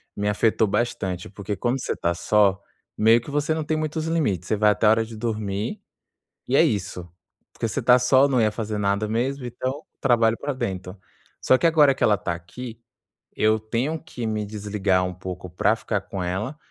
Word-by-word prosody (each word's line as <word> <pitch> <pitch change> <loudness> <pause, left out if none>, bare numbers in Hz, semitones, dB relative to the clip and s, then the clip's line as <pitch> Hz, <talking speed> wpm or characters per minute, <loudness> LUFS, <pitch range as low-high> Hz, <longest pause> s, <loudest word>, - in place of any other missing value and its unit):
me 105 0 -2
afetou 110 +1 +2
bastante, 100 -5 -2
porque 100 +1 -5
quando 120 +7 -1
você - - -2
tá 85 - 0
só, 100 +2 +2 0.4
meio 115 +2 +5
que 145 - -9
você 150 +2 0
não 160 0 -2
tem 155 +1 -1
muitos 155 +1 -2
limites, 110 - 0
você - - +2
vai 105 0 +4
até 105 +2 0
a - - +7
hora 110 +1 +3
de 115 0 -10
dormir 105 -2 -3 0.7
e - - -2
é - - +7
isso. 90 -4 -2 0.4
Porque - - -3
você 115 +5 -2
tá 125 +1 +6
só, 130 +2 +4
não 130 -2 +1
ia 110 -1 +3
fazer 105 -1 -4
nada 100 +1 0
mesmo, 125 +4 -1
então 130 +4 -4 0.2
trabalho 115 -3 +3
pra 145 - -3
dentro. 95 -6 -5 0.4
Só 130 - +4
que, 170 - +1
agora 150 -4 +5
que - - -1
ela 105 - +4
tá 85 -1 -2
aqui, 110 +7 -9 0.6
eu 110 0 +2
tenho 125 +9 -2
que 130 -9 -7
me 110 -1 -2
desligar 100 -3 0
um 90 0 -3
pouco 90 0 -7
pra 90 - +2
ficar - - -2
com 95 -2 -5
ela. 100 +11 -3
110 Hz, 200 wpm, -24 LUFS, 100-125 Hz, 0.7 s, a